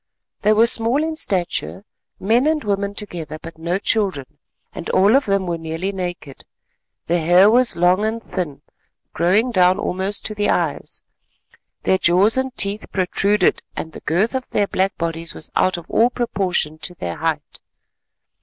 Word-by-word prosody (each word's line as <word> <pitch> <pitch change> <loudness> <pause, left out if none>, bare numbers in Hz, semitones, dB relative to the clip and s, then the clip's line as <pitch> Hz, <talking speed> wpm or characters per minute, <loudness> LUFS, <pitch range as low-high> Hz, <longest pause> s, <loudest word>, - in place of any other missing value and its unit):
They 210 - +3
were 220 +2 +5
small 235 +5 +1
in 320 0 -2
stature, 190 - -2 0.3
men 235 +8 +2
and 310 -1 +1
women 200 -1 -2
together, 165 -7 -5
but 165 0 -11
no 170 +3 -1
children, 195 - -1 0.3
and - - -7
all 200 +5 +4
of 275 -3 +2
them 195 -1 +1
were 170 -2 -3
nearly 165 +4 -3
naked. 175 -7 -6 0.6
Their 170 0 0
hair 180 +5 +6
was 250 +1 +3
long 180 +4 +3
and 220 +1 -1
thin, 180 -10 -5 0.5
growing 205 +8 +2
down 185 -2 +4
almost 195 0 -1
to 215 - -1
the 205 0 0
eyes, - - -2 0.8
their 190 - +2
jaws 185 +6 +3
and 260 0 -1
teeth 200 +2 -1
protruded 195 +1 +1 0.2
and 160 - -5
the - - -10
girth 185 - 0
of 260 -1 -4
their 205 - +1
black 195 0 -1
bodies 165 0 -3
was - - -3
out 185 - +2
of 170 - -10
all 235 +2 +3
proportion 190 -10 -2
to 180 - -3
their 85 - -5
height. - - -3
195 Hz, 165 wpm, -20 LUFS, 175-215 Hz, 0.8 s, hair